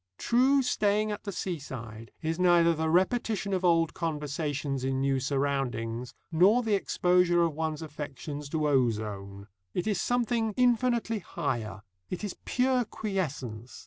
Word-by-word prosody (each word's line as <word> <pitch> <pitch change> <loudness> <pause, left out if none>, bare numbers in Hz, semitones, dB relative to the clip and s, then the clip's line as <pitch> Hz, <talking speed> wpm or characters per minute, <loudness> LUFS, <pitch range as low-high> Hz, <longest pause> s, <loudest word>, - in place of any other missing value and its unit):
True 265 +3 +3
staying 210 -2 +1
at 205 - -6
the 200 - -3
seaside 130 - -6
is 160 +1 -1
neither 175 -2 +5
the 160 0 -1
repetition 200 +3 +1
of 185 -1 0
old 165 -3 +3
conversations 150 -4 -2
in 130 0 0
new 135 0 +1
surroundings 130 -4 -2 0.2
nor 195 +9 +5
the 220 -2 0
exposure 180 -3 +3
of 165 -2 +1
one's 160 0 -3
affections 145 -1 -6
to 155 0 0
ozone. 105 -7 -1 0.3
It 175 - -1
is 210 -5 0
something 235 -3 0
infinitely 240 -2 +2
higher. 110 - -4 0.3
It 180 - -5
is 205 - -4
pure 255 0 +2
quiescence. 150 - -4
165 Hz, 140 wpm, -29 LUFS, 135-205 Hz, 0.3 s, neither